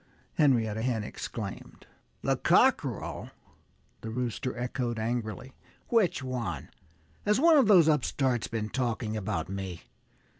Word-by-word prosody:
Henrietta 115 -7 +2
Hen 115 -3 0
exclaimed. 105 -1 -7 0.4
"The - - +2
cockerel!" - - +2 0.7
the 110 - -5
Rooster 125 +1 -3
echoed 120 -1 -2
angrily. 115 +2 -3 0.4
"Which 205 - +2
one? 125 -8 -4 0.5
Has 210 +3 +2
one 330 +2 +6
of 265 -6 +5
those 180 -7 +7
upstarts 130 -5 +1
been 110 -2 -3
talking 115 -3 -2
about 100 -6 -2
me? 95 -3 -5
120 Hz, 115 wpm, -29 LUFS, 110-135 Hz, 0.7 s, those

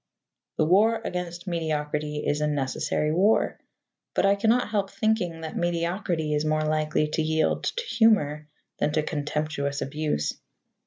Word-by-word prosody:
The 155 - +3
war 215 +7 +4
against 175 0 -4
mediocrity 150 -3 -2
is 145 +1 0
a 150 - +2
necessary 150 +1 -1
war, 195 +7 +2 0.6
but - - +3
I 195 - +5
cannot 220 +4 +2
help 200 -2 0
thinking 205 -8 0
that 160 -1 -6
mediocrity 170 -2 -1
is 150 0 +1
more 155 0 +1
likely 155 0 +1
to 160 - 0
yield 160 0 +1
to 485 - -2
humour 200 - +2 0.3
than 150 - +1
to 155 -1 +1
contemptuous 145 -1 -2
abuse. 150 - -1
155 Hz, 145 wpm, -26 LUFS, 150-185 Hz, 0.6 s, I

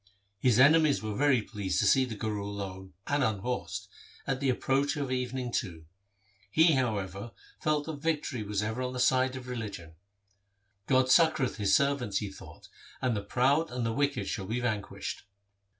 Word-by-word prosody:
His 120 0 +3
enemies 145 0 +5
were 110 -1 -3
very 140 -4 +3
pleased 100 -5 -3
to - - +2
see 130 -1 +5
the 115 -3 -6
Guru 105 -1 -3
alone 95 -2 -6
and 145 -1 +1
unhorsed, 100 -3 -2 0.4
at 135 -1 -1
the 140 -1 0
approach 135 +3 +1
of 140 -3 -3
evening 125 -1 -2
too. 80 -7 -3 0.6
He, 160 - +5
however, 105 -4 -2 0.3
felt 150 -1 0
that 160 -2 -5
victory 150 -5 -2
was 105 0 -2
ever 110 +4 -3
on 125 0 -3
the 125 - -4
side 130 +1 +3
of 130 -1 -8
religion, 105 -9 -6 0.5
' 100 0 -46
God 130 -1 +4
succoureth 160 -6 +4
His 100 -3 +3
servants,' 140 -8 +1
he 100 -1 -3
thought, - - -13 0.2
' - - -21
and 125 -3 +1
the 100 - -2
proud 140 +9 +2
and 125 -1 -3
the 115 - 0
wicked 140 +2 0
shall 100 -7 -3
be 115 +4 -1
vanquished.' 110 -4 -3
125 Hz, 180 wpm, -29 LUFS, 100-135 Hz, 0.6 s, enemies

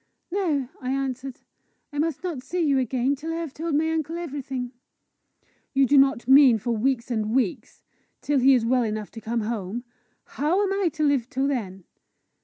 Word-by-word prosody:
"No," 325 -9 0
I 255 - -4
answered. 265 -1 -3 0.5
"I 290 - -3
must 320 0 -1
not 335 -8 -3
see 355 +7 -3
you 280 -3 +3
again 255 +2 0
till 310 +4 -6
I - - -2
have 330 -4 -4
told 320 0 -2
my 320 +2 +2
uncle 320 +1 -2
everything." 270 -6 -5 1.0
"You 270 0 +5
do 285 - +3
not 270 -3 +4
mean 265 -3 +7
for 235 +3 -3
weeks 250 +2 0
and 220 0 -1
weeks 240 -9 -2 0.4
till 290 -1 +1
he 265 +1 +6
is 235 -2 +1
well 250 +2 +3
enough 215 -2 -3
to 225 - -9
come 230 +1 -2
home? 215 +1 -4 0.4
How 335 +8 0
am 390 -1 0
I 390 -3 +1
to 310 -2 -2
live 275 -4 +2
till 270 +1 0
then!" 195 -9 -3
270 Hz, 190 wpm, -25 LUFS, 240-300 Hz, 1.0 s, mean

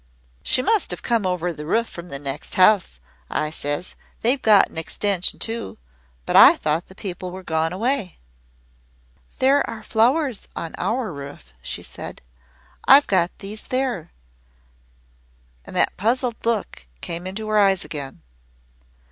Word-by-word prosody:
"'She 255 - +2
must 435 +8 +2
have - - -4
come 230 -5 +1
over 180 -1 -1
the 150 -1 -8
roof 225 +9 0
from 170 0 -10
the 140 - -4
next 140 0 -4
house,' 185 - +4 0.3
I 155 0 -1
says. 145 +3 -3 0.3
'They've 255 +4 +2
got 210 -3 +6
an - - -13
extension 185 +2 0
too 230 0 -5 0.5
but - - -2
I - - +9
thought 155 +2 -1
the 190 - -15
people 185 -2 -6
were 185 +1 -9
gone 160 -1 0
away.' 225 0 -1 1.2
"'There 275 +2 +4
are 220 -1 -7
flowers 250 +3 +1
on 165 - -5
our 230 -5 -1
roof,' 140 - -10
she - - -5
said. - - -8 0.6
'I 275 +2 +9
got 185 -9 +1
these 210 +2 -7
there.' 255 - -2 1.5
And - - -10
that - - +3
puzzled 235 +3 0
look 220 - -2
came 170 +2 -4
into 215 +3 -5
her 215 0 +3
eyes 195 -2 +3
again. 140 -3 -7
195 Hz, 150 wpm, -22 LUFS, 165-230 Hz, 1.5 s, I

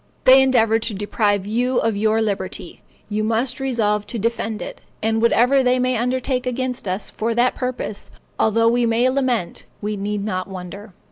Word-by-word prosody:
They 260 +1 +8
endeavor 225 -4 +3
to 225 -2 -2
deprive 205 -1 0
you 245 +4 0
of 225 -1 +1
your 220 +2 +2
liberty; 190 -4 -4 0.3
you 215 0 -2
must 235 +4 -1
resolve 215 -6 0
to 240 - -4
defend 225 0 -2
it; - - -8 0.2
and 225 0 +1
whatever 245 +4 +4
they 250 0 +2
may 255 0 +1
undertake 250 +2 -1
against 250 -2 -2
us 185 +3 -3
for 230 +1 -2
that 245 +1 +3
purpose, 250 -5 -5 0.3
although 230 +1 +3
we 240 0 +2
may 230 +2 +2
lament, 255 -9 -1
we 210 0 -3
need 205 0 -3
not 185 -3 -2
wonder. 190 +2 -9
225 Hz, 175 wpm, -21 LUFS, 210-250 Hz, 0.3 s, They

